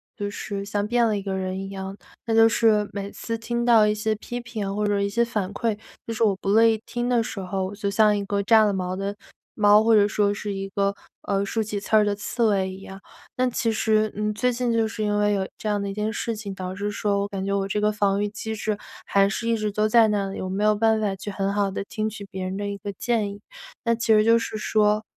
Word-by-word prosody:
就 205 -2 -3
是 200 -1 -5
像 205 +1 -2
变 240 0 +3
了 215 -2 +1
一 - - -3
个 195 - -3
人 185 0 -3
一 195 0 -5
样。 195 0 -6 0.3
那 225 -1 0
就 225 0 +7
是 220 -2 +3
每 200 0 -4
次 230 0 -4
听 235 +1 -2
到 225 -3 +6
一 210 - +1
些 215 +1 0
批 240 +3 -6
评 215 -5 -4
或 210 0 0
者 205 -1 +1
一 200 - 0
些 235 +4 +1
反 205 -4 -3
馈， 230 -1 -1 0.3
就 230 - -4
是 225 - 0
我 205 -3 +3
不 195 - -4
乐 220 +3 +5
意 225 -1 +3
听 240 +1 -3
的 240 -2 +3
时 220 - -6
候， 190 0 -2
我 195 - -6
就 200 -1 -2
像 210 +1 +4
一 200 - -2
个 200 0 -1
炸 220 +1 +6
了 205 - +1
毛 185 -1 -2
的 195 +1 -3 0.4
猫， 210 0 +5
或 225 0 +5
者 205 -1 +5
说 205 0 +1
是 205 0 -4
一 195 0 -4
个， 200 0 0 0.3
呃， 200 -1 0
竖 220 +2 -1
起 210 -1 -3
刺 205 - -1
儿 215 - +6
的 205 - +1
刺 235 +3 -2
猬 195 -3 +2
一 190 +1 -9
样。 195 0 -10 0.4
但 255 0 +1
其 230 -1 0
实， 215 -1 +1
嗯， 210 0 -1
最 250 +4 +1
近 245 0 -1
就 225 -1 +2
是 220 0 -6
因 210 0 +1
为 205 0 +2
有 190 -1 -1
这 215 - -6
样 205 -1 0
的 200 - -3
一 - - -4
件 210 +2 -2
事 230 +1 -2
情， 205 -2 -6
导 185 0 -5
致 205 +2 -3
说 205 -1 0
我 200 - -1
感 195 -1 -4
觉 200 - -2
我 200 -1 0
这 205 +2 -1
个 210 - +3
防 200 -1 +1
御 205 - +1
机 220 +1 -5
制 215 0 -2 0.3
还 195 0 +3
是 230 +4 -3
一 230 - +2
直 215 -1 -2
都 215 +1 +1
在 225 0 +5
那 205 -2 0
里， 195 - -6
我 185 - -4
没 195 +3 -1
有 215 0 +4
办 220 +1 +3
法 200 -2 0
去 195 +2 -6
很 195 0 -1
好 200 -1 +1
地 200 - -3
听 215 0 -2
取 205 -1 -8
别 190 0 -5
人 185 +1 -3
的 205 0 -3
一 200 0 -4
个 200 +1 -6
建 215 -1 -1
议。 200 - -10 0.5
那 230 0 +3
其 230 -1 +2
实 215 0 +5
就 230 +1 +6
是 225 -1 -3
说 215 0 +2
210 Hz, 300 characters per minute, -24 LUFS, 200-220 Hz, 0.5 s, 就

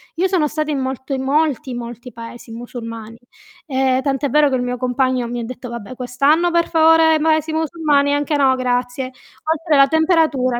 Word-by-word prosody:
Io 370 +3 +1
sono 350 -6 +1
stata 305 0 -3
in 280 - -1
molto 265 +1 -4
in 265 - -2
molti, 285 -2 0
molti 240 +1 -8
paesi 230 0 -10
musulmani. 230 -1 -8 0.5
Ehm, 265 -1 +1
tant'è 275 0 -1
vero 295 +1 +4
che 260 - 0
il 250 - -1
mio 250 0 -3
compagno 255 0 0
mi 240 0 -4
ha - - -4
detto: 245 +1 -8
"Vabbè, 235 +1 -8
quest'anno 280 +7 +1
per 340 0 +1
favore 320 -1 +4
paesi 315 0 +1
musulmani 300 -3 +1
anche 290 +1 -1
no, 265 -2 +3
grazie". 250 0 -2 0.4
Oltre 320 0 0
alla 275 -1 +6
temperatura, 315 -6 +1
270 Hz, 180 wpm, -19 LUFS, 245-310 Hz, 0.5 s, alla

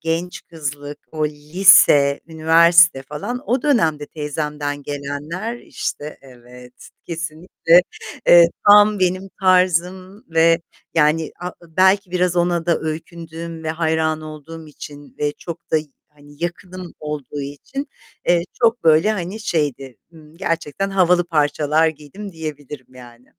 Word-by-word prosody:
genç 165 +2 -3
kızlık, 145 -2 -6
o 155 -1 0
lise, 150 -2 +4
üniversite 165 -1 +4
falan 175 - -6
o 250 +2 0
dönemde 160 - +1
teyzemden 150 -1 -4
gelenler, 145 - -5
işte 150 -8 -6
Evet, 125 -1 -15 0.2
kesinlikle, 170 +1 +1 0.5
eee, 170 -1 +8 0.2
tam 205 0 +7
benim 185 +1 -1
tarzım 185 +1 +1
ve 165 +1 +3 0.3
yani, 160 0 +2
a 180 0 -4
belki 185 +3 +2
biraz 180 -1 0
ona 175 -1 0
da 170 - +2
öykündüğüm 165 +1 -7
ve 155 - -1
hayran 160 -1 -1
olduğum 155 +1 -10
için 145 -1 -12
ve 145 0 -1
çok 170 +2 -10
da - - +3
y 155 0 -2 0.4
yakınım 175 +4 -7
olduğu 150 -2 -6
için, 145 - -7 0.4
eee, 175 -1 +3 0.2
çok 230 -2 +2
böyle 160 +6 +4
hani 195 +1 -5
şeydi, 140 - -2 0.2
ımm, 155 -1 -17
gerçekten 165 +1 -3
havalı 180 -2 +3
parçalar 155 0 +1
giydim 160 +7 -9
diyebilirim 150 -5 -8
yani. 120 -1 -15
160 Hz, 125 wpm, -20 LUFS, 150-180 Hz, 0.5 s, eee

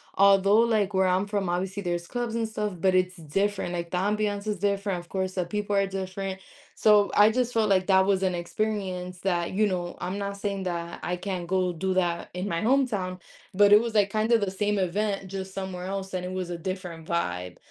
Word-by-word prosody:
although, 200 +2 +5
like, 215 -4 +2
where 190 0 +3
I'm 185 +2 +2
from, 200 -3 -2
obviously, 190 +3 -2
there's 175 -1 -2
clubs 240 -2 -3
and 225 -1 0
stuff, 210 -2 -3
but 185 +1 +3
it's 185 0 +2
different. 185 +4 -1
Like, 170 -1 -3
the 180 - -2
ambiance 205 +1 0
is 210 -3 -2
different 200 -2 0
of 175 - -13
course, 190 -1 -2
the 180 - 0
people 205 +2 -2
are 195 0 +3
different. 190 0 -4 0.4
So, 210 -2 +4
I 210 +1 +7
just 245 0 0
felt 220 -2 +2
like 185 -1 +3
that 190 -1 +5
was 195 -1 +2
an 185 -1 +1
experience 180 -1 -3
that, 175 -2 0
you 215 +2 +3
know, 175 -2 -3
I'm 190 +2 -3
not 200 0 -4
saying 200 -1 -3
that 170 -1 -4
I 180 - -1
can't 180 -2 -4
go 185 -1 +1
do 185 +3 -1
that 175 -2 0
in 185 +3 -3
my 170 -3 -1
hometown, 215 -8 +1 0.4
but 205 +1 +6
it 210 - +8
was, 230 -1 -3
like, 200 -1 +3
kinda 220 +2 +3
the 200 -3 -1
same 205 +1 0
event 195 +1 -1
just 190 -1 -5
somewhere 190 -2 -5
else, 195 0 -4
and 180 -1 -2
it 180 - -4
was 185 -1 -3
a 170 - -3
different 180 -3 -6
vibe. 90 - -2
190 Hz, 220 wpm, -27 LUFS, 180-205 Hz, 0.4 s, it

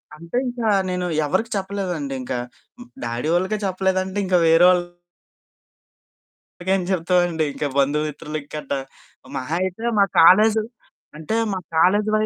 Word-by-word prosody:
అంటే 170 +8 -6
ఇంకా 240 -2 -3 0.2
నేను 180 0 -2 0.2
ఎవరికీ 190 +10 -1
చెప్పలేదండి. 190 -7 -3
ఇంకా 125 0 -3 0.7
డ్యాడీ 120 +5 -3
వాళ్ళకే 185 +4 0
చెప్పలేదంటే 190 0 -1
ఇంకా 185 -1 +2
వెరోళ్ళకేం 175 +1 +2 1.8
చెప్తామండి. 175 -2 +1
ఇంకా 145 - -2
బంధుమిత్రుల 150 +2 -1 0.2
గట్ట. 150 - -7 0.7
మహా 130 +5 -3
అయితే 190 +6 -2
మా 200 - +6 0.2
కాలేజి 215 +6 +6 0.5
అంటే 160 +8 -3 0.2
మా 190 - -2 0.2
కాలేజి 205 +6 +3
వై 215 0 +2
180 Hz, 115 wpm, -22 LUFS, 160-195 Hz, 1.8 s, మా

